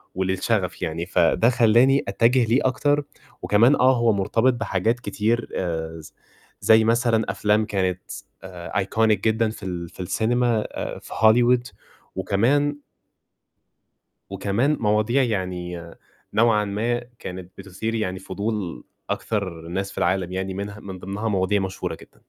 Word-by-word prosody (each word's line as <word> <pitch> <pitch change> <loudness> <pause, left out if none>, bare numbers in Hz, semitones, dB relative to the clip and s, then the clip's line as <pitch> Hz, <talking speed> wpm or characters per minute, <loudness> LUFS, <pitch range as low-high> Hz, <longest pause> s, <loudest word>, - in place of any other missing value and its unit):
وللشغف 95 +1 -1
يعني. 80 +1 -2
فده 90 +5 +3
خلّاني 125 +3 +4
أتجّه 120 +5 +3
ليه 115 +4 +3
أكتر 145 +3 +2 0.4
وكمان 115 +7 +4
آه، 130 0 +4
هو 115 -2 +3
مرتبط 115 +6 +2
بحاجات 120 0 -1
كتير، 110 +2 -1
آآ، 80 -2 -3
ز 75 - -13 0.5
زي 110 0 +6
مثلًا 115 0 +2
أفلام 105 +2 +1
كانت 95 -3 -1 0.4
آآ، 90 0 -3
iconic 100 +3 -3 0.2
جدًا 110 +1 +1
في 110 - -10
ال 85 -2 -5
في - - -20
السينما، 115 +4 +1 0.4
في - - -14
هوليوود 120 +2 +4 0.5
وكمان 130 +10 +1 1.5
وكمان 105 +9 0
مواضيع 110 +5 +2
يعني 90 -5 -3 0.4
نوعًا 110 -2 +3
ما، 115 +4 -1 0.2
كانت 90 0 -8
بتُثير 110 +4 -4
يعني 95 -4 -2
فضول 100 - -4 0.3
أكثر 95 -6 -2
الناس 95 +3 -3
في - - -15
العالم، 90 -1 0
يعني 95 +1 -3
منها 100 +2 -6
من 95 -2 -8
ضِمنها 100 +5 -4
مواضيع 100 0 +1
مشهورة 95 -3 -4
جدًا. - - -18
105 Hz, 130 wpm, -23 LUFS, 95-115 Hz, 1.5 s, زي